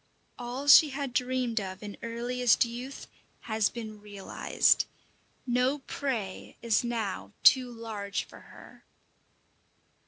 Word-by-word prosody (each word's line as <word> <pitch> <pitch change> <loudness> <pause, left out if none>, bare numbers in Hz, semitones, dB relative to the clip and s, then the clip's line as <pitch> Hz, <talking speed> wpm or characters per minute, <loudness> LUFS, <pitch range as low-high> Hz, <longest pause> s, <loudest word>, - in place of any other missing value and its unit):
All 250 +3 -5
she 295 +1 +9
had 275 -2 -4
dreamed 250 -2 0
of 190 +1 -7
in 205 -1 -7
earliest 240 +1 +1
youth 245 +3 -7 0.4
has 220 -2 0
been 215 -3 -8
realized; 205 -2 +1 0.6
no 250 +3 +1
prey 255 -8 -5
is 230 -1 +2
now 230 -5 -3
too 255 -2 +6
large 215 -4 -4
for - - -15
her. - - -16
235 Hz, 115 wpm, -29 LUFS, 215-255 Hz, 0.6 s, she